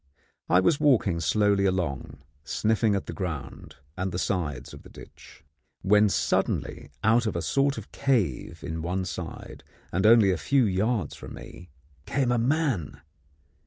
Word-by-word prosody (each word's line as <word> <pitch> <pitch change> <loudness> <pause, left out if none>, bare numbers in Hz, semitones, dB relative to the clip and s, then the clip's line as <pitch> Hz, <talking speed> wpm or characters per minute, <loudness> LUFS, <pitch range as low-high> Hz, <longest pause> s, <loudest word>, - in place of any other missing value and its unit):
I 90 - +5
was 140 - +2
walking 120 - +3
slowly 100 +4 +2
along, 75 -7 -2 0.2
sniffing 105 - +1
at 100 - -3
the - - -6
ground 80 -9 -6 0.2
and 95 +1 -3
the 90 - -4
sides 80 -10 -3
of - - -11
the - - -15
ditch, - - -15 0.4
when 105 +2 +4
suddenly - - -1
out 115 +2 +3
of 105 - -2
a 85 - -1
sort 140 - +1
of - - -9
cave 110 - -1
in 80 +1 -4
one 90 +3 -2
side, 90 -2 -7 0.3
and 95 +4 +2
only 110 -4 +6
a 90 - 0
few 135 +4 +2
yards 105 +3 0
from - - -10
me, 85 +1 -12 0.4
came 135 -3 0
a 120 - +2
man! 130 - -1
95 Hz, 160 wpm, -26 LUFS, 85-115 Hz, 0.4 s, only